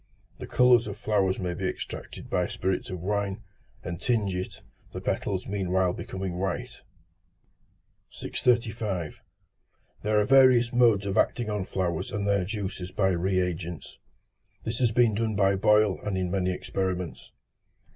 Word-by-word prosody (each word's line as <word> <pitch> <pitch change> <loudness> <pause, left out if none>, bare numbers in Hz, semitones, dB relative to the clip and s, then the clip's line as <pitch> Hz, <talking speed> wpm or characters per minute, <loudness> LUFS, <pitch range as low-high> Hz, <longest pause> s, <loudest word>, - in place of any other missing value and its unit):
The - - -7
colours 125 -2 +4
of 100 -1 -6
flowers 100 -3 +1
may 90 -2 -2
be 95 +1 -2
extracted - - -6
by - - 0
spirits 95 0 -2
of 90 -2 -5
wine, 100 +2 -2 0.4
and 85 -1 -5
tinge 110 -6 +1
it; 90 0 -5 0.3
the - - -4
petals 95 -2 -2
meanwhile 95 -2 0
becoming 95 -2 -5
white. 120 +6 -3 1.3
635. 110 -8 -1 0.8
There 105 0 +2
are 105 - +2
various 130 -3 +5
modes 115 -5 +4
of 100 -1 -2
acting 120 -3 +1
on 105 -3 -2
flowers 90 +6 -2
and 105 -3 -2
their 100 -2 +2
juices 95 -3 -4
by 95 0 +2
re 95 +1 +1
agents. 85 -2 -5 0.6
This 115 +1 -3
has 120 -3 +3
been 115 -1 +4
done 110 0 -1
by 100 0 +3
Boyle 105 0 +3
in 95 -3 -1
many 95 -1 0
experiments. 90 -1 -3
100 Hz, 145 wpm, -27 LUFS, 95-110 Hz, 1.3 s, various